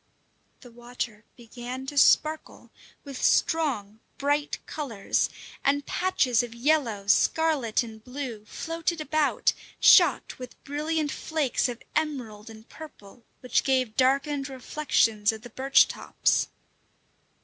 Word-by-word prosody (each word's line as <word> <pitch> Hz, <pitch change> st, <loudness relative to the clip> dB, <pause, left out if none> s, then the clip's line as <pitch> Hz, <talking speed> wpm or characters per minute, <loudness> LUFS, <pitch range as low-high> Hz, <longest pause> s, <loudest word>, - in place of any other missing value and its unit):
The 245 Hz, -, -14 dB
water 240 Hz, -2 st, -7 dB
began 245 Hz, +2 st, -8 dB
to 290 Hz, -, -7 dB
sparkle 310 Hz, +2 st, +2 dB, 0.3 s
with 275 Hz, -3 st, -8 dB
strong, 235 Hz, -10 st, +1 dB, 0.2 s
bright 290 Hz, +1 st, 0 dB
colours, 240 Hz, -10 st, -2 dB, 0.3 s
and 285 Hz, 0 st, +1 dB
patches 265 Hz, -10 st, +1 dB
of 240 Hz, -1 st, -7 dB
yellow, 235 Hz, -6 st, 0 dB
scarlet, 270 Hz, +2 st, +2 dB
and 220 Hz, -2 st, -11 dB
blue 250 Hz, -4 st, -6 dB
floated 330 Hz, +7 st, -3 dB
about, 310 Hz, -1 st, +1 dB, 0.3 s
shot -, -, +5 dB
with 250 Hz, -1 st, -11 dB
brilliant 300 Hz, +1 st, -2 dB
flakes 290 Hz, -4 st, -1 dB
of 240 Hz, -1 st, -7 dB
emerald 250 Hz, -9 st, -3 dB
and 220 Hz, 0 st, -13 dB
purple, 245 Hz, -8 st, -13 dB, 0.2 s
which 250 Hz, -, +1 dB
gave 255 Hz, -5 st, 0 dB
darkened 275 Hz, +2 st, +1 dB
reflections 245 Hz, -5 st, +1 dB
of 220 Hz, 0 st, -10 dB
the 245 Hz, -, -11 dB
birch 270 Hz, +1 st, +4 dB
tops. -, -, 0 dB
260 Hz, 115 wpm, -26 LUFS, 230-295 Hz, 0.3 s, shot